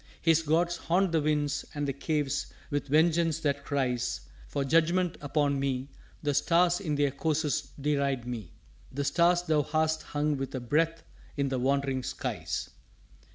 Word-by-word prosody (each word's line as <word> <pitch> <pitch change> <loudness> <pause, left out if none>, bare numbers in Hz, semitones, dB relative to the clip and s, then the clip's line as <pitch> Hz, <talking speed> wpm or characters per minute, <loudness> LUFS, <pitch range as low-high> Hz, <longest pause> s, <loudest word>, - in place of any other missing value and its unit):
His 165 -1 +4
gods 170 +2 +1
haunt 180 +3 +1
the 160 -2 +2
winds 145 -1 0
and 145 -1 -1
the 140 - -1
caves 145 0 -1 0.2
with 145 0 -1
vengeance 160 +2 +3
that 140 -2 0
cries 125 -4 -1 0.3
For 140 -1 -2
judgment 165 +4 +2
upon 145 -1 +1
me; 135 0 -1 0.3
the 145 -1 +1
stars 170 +4 +3
in 155 -7 -2
their 145 -1 +2
courses 155 +1 -1
deride 140 -3 0
me 115 -9 -5 0.4
The 140 +2 -2
stars 175 +4 +3
Thou 155 -4 +2
hast 155 +2 0
hung 145 0 -1
with 135 0 -4
a - - -1
breath 160 +7 0 0.3
in 140 -1 +1
the 130 -1 -1
wandering 135 0 +1
skies. - - -4
145 Hz, 155 wpm, -29 LUFS, 140-160 Hz, 0.4 s, His